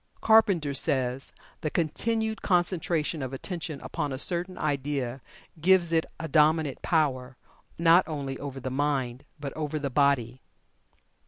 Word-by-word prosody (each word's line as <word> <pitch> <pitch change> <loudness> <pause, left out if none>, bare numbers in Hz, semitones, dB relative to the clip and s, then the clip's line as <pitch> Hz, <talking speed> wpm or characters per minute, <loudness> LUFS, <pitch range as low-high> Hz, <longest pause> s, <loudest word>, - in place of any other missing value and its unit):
Carpenter 195 -10 +4
says: 130 -1 0 0.3
"The 155 - -2
continued 220 +8 -1
concentration 175 -4 0
of 130 0 -4
attention 155 0 -5
upon 145 - -3
a 130 - -3
certain 175 +5 -1
idea 140 -3 -2 0.4
gives 180 -1 +4
it 160 -1 +2
a 160 - -4
dominant 155 -1 +2
power, 130 -6 0 0.4
not 170 +2 +5
only 140 -4 -4
over 140 -1 -6
the 130 0 -5
mind, 135 -2 -1
but 140 -2 -5
over 155 0 -3
the 140 -2 -3
body." 130 -3 +1
150 Hz, 135 wpm, -27 LUFS, 135-170 Hz, 0.4 s, not